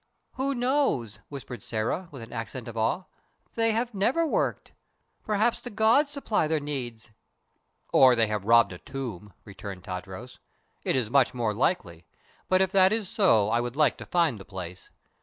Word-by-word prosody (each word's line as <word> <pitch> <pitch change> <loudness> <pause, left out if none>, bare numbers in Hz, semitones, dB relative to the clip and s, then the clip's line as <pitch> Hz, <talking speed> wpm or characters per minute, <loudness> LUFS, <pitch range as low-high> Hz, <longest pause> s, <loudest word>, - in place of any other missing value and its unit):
"Who 270 +1 -1
knows?" 245 - 0
whispered 130 -5 -8
Sĕra, 115 - -3
with 135 -5 -9
an 115 - -11
accent 115 +2 -5
of 115 - -7
awe. 115 +11 0 0.5
"They 225 0 +2
have 235 +2 -1
never 240 +12 +2
worked. 315 - -1 0.5
Perhaps 215 +2 +1
the 245 - -7
gods 225 +7 +3
supply 255 - 0
their 160 0 +1
needs." 120 -6 -6 0.8
"Or 130 -2 +7
they 115 -1 +3
have 105 -2 -3
robbed 115 0 +5
a 90 - -10
tomb," 110 -7 -7
returned 100 -2 -8
Tadros. 95 +7 -7 0.4
"It - - 0
is 120 -4 0
much 130 -2 +3
more 115 -3 0
likely; 90 - -1 0.4
but 185 0 +4
if 190 - -2
that 190 -1 +5
is 215 -4 -1
so 185 - +3
I 120 - +2
would 120 +1 -4
like 150 0 +3
to - - -9
find 165 - +1
the - - -9
place. 90 -1 -8
130 Hz, 175 wpm, -27 LUFS, -, 0.8 s, Or